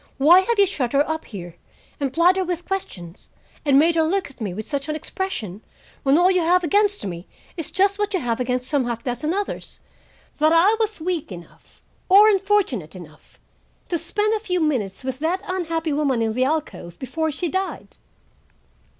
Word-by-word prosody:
Why 320 +7 +7
have 455 +5 0
you 400 - +6
shut 275 -10 -3
her 285 +1 +3
up 315 0 -3
here, 175 -5 -9 0.4
and 275 -2 -1
plied 340 +5 +4
her 380 - 0
with 355 -1 -4
questions, 185 - -6 0.3
and 280 -2 +4
made 325 +4 +5
her 330 - +2
look 345 0 0
at 265 - -20
me 205 -4 -2
with 210 +4 -6
such 280 0 -3
an 305 - -1
expression, 290 - -5 0.4
when 275 +1 +3
all 360 +2 +5
you 365 -1 +2
have 355 +2 +3
against 405 - +1
me 175 -2 -6 0.3
is 330 -5 -4
just 395 +2 +1
what 415 0 0
you - - +1
have 240 -4 -2
against 250 0 -1
some 280 -3 0
half 235 -1 -4
dozen 250 +5 -2
others,—that 345 -4 -4
I 355 +7 +5
was 435 -3 -1
weak 335 - -3
enough, 175 -2 -13 0.3
or 405 +3 +8
unfortunate 390 - 0
enough, 160 -4 -14 0.5
to 340 - 0
spend 415 +6 0
a 440 - 0
few 365 -4 -2
minutes 250 - -1
with 260 0 -4
that 350 +5 -1
unhappy 330 -4 -2
woman 275 -5 +1
in 220 -1 -1
the 255 +3 +1
alcove 280 - -3
before 315 +5 -2
she 345 +4 -3
died?" 380 +4 -4
315 Hz, 190 wpm, -22 LUFS, 250-370 Hz, 0.5 s, or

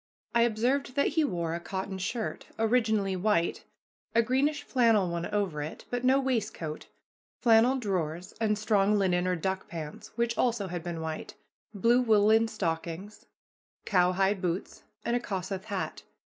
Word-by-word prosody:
I 235 - +4
observed 245 +4 +1
that 280 - +3
he 320 +1 +2
wore 170 - -1
a 170 - -2
cotton 190 +3 -4
shirt, 220 +4 -3
originally 220 -4 +2
white, 180 -3 0 0.5
a 230 - +5
greenish 265 +6 +1
flannel 225 -7 +3
one 170 0 -2
over 195 -8 -1
it, 150 +2 -7
but 245 0 -2
no 260 +2 +5
waistcoat, 220 - -2 0.5
flannel 235 +2 +5
drawers, 180 -6 -2
and 210 -2 +2
strong 210 -1 +2
linen 180 -2 +2
or 180 - +1
duck 190 +3 -2
pants, 155 -3 -7
which 235 0 +1
also 230 -6 +1
had 175 -1 -4
been 170 -1 -5
white, 160 -1 -5 0.4
blue 235 +5 +4
woolen 220 -1 +4
stockings, 180 -1 -4 0.6
cowhide 190 +1 +2
boots, 180 0 -3 0.2
and 235 - +1
a - - +2
Kossuth 190 -3 -4
hat. 200 -3 -4
205 Hz, 150 wpm, -29 LUFS, 180-230 Hz, 0.6 s, a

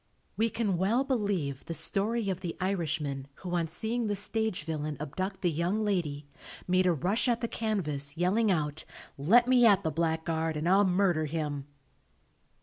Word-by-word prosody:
We 225 +1 +2
can 205 -6 -1
well 220 +8 +2
believe 200 - -1
the 165 - -3
story 200 +6 0
of 185 0 -5
the 175 -3 -5
Irishman, 155 -7 -2
who 180 -2 -6
on 170 -2 +1
seeing 225 +7 -2
the 205 - 0
stage 220 -3 -2
villain 155 -2 -3
abduct 185 +7 -4
the 175 - +3
young 175 +7 0
lady, 155 -8 -1 0.4
made 185 0 +3
a - - +5
rush 185 - 0
at 235 -2 +2
the 235 - 0
canvas 155 -11 -2
yelling 200 +6 +2
out, 155 -4 -1 0.3
"Let 225 - +4
me 250 -1 +5
at 200 -2 +4
the 160 - 0
blackguard 160 0 -1
and 155 +3 -2
I'll 195 +3 +5
murder 180 -4 +2
him." 145 -3 -3
180 Hz, 170 wpm, -29 LUFS, 155-205 Hz, 0.4 s, a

